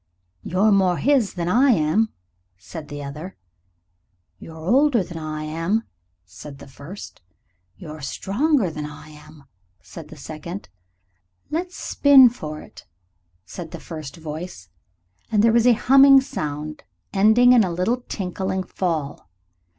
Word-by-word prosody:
"You're 190 - +1
more 190 -3 +3
his 265 -9 +1
than 170 -2 -3
I 250 +9 +4
am," 205 +2 +2 0.5
said 150 - -10
the 145 0 -7
other. 150 +7 -8 1.0
"You're 160 +7 -11
older 245 - +2
than 170 -2 -8
I 155 -1 -5
am," 165 +8 -1 0.4
said 140 - -11
the - - -13
first. 140 +9 -11 0.6
"You're 155 0 -9
stronger 205 - 0
than 150 -1 -5
I 150 +1 -12
am," 150 -1 -15 0.4
said 160 - -11
the 155 - -13
second. 160 +6 -8 0.8
"Let's 355 +3 -3
spin 275 -3 +6
for 155 -10 -7
it," - - -15 0.6
said 170 - -8
the - - -8
first 155 -4 -8
voice, 155 - -8 0.6
and 210 -1 +3
there 230 0 +4
was 235 +1 +4
a 245 - +7
humming 270 +3 +6
sound 155 - -5 0.3
ending 220 +5 +5
in 240 -3 +6
a 185 - -2
little 185 +8 0
tinkling 190 -4 -4
fall. 160 - -4
180 Hz, 135 wpm, -22 LUFS, 155-225 Hz, 1.0 s, a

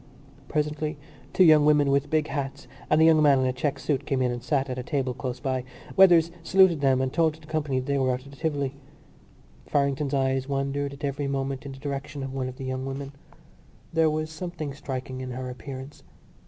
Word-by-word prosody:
Presently 150 0 -1 0.3
two 185 - +5
young 155 -3 +7
women 145 -2 +4
with 140 +1 +1
big 155 -1 +2
hats 140 -2 -4 0.2
and 155 - +4
a - - +6
young 160 -1 +6
man 145 -2 +6
in - - +1
a 130 - +1
check 140 +2 -1
suit 140 -1 -2
came 135 - 0
in 125 - +1
and 120 0 -4
sat 140 +1 0
at 130 -1 -4
a - - -2
table 130 -1 -1
close 125 0 -5
by. 130 -2 -1 0.3
Weathers 170 -3 +6
saluted 185 -3 +4
them 135 -2 +3
and 130 -1 -1
told 160 -2 +2
the 155 -1 -17
company 150 -4 -1
that 130 - -5
they 140 0 0
were 130 -1 +2
out 125 +1 -3
of 140 - -12
the 140 - -14
Tivoli. 140 -4 -1 0.9
Farrington's 140 0 0
eyes 135 0 0
wandered 140 0 -1
at 140 +2 -12
every 140 0 -2
moment 135 0 -3
in - - -6
the - - -11
direction 140 0 -5
of 135 0 -5
one 130 -1 -2
of 130 - -10
the 135 - -6
young 130 0 -3
women. 135 +1 -5 0.8
There 160 -1 +4
was 155 +1 -2
something 160 -3 -5
striking 130 -2 -5
in 130 - -5
her 125 0 -5
appearance. 135 +3 -9
140 Hz, 220 wpm, -26 LUFS, 130-150 Hz, 0.9 s, young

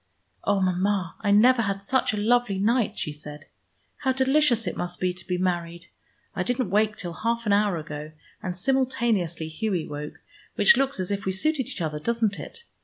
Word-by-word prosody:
"Oh, 200 -1 +2
Mama, 185 -1 0
I 205 - 0
never 235 +5 +6
had 200 -2 -1
such 255 +7 +1
a 210 - -3
lovely 225 -1 +2
night," 225 +3 +1
she 150 - -2
said. 150 0 -10 0.5
"How 265 - 0
delicious 260 -3 +3
it - - -3
must 175 0 -3
be 180 -1 0
to 180 -1 -9
be 180 -1 0
married! 175 -1 -2 0.5
I - - -1
didn't 245 0 -1
wake 210 +1 +2
till 175 -2 -4
half 230 +5 -2
an 205 - +3
hour 200 -3 +2
ago, 150 -1 -7 0.3
and 180 -4 -4
simultaneously 230 -9 0
Hughie 175 +1 -2
woke, 150 0 -7 0.3
which 475 - +6
looks 275 -4 0
as 185 +1 -2
if 200 0 -2
we 190 - +1
suited 270 +6 0
each - - -5
other, 150 -2 -2
doesn't 225 +2 0
it? 470 - -6
200 Hz, 190 wpm, -25 LUFS, 175-235 Hz, 0.5 s, never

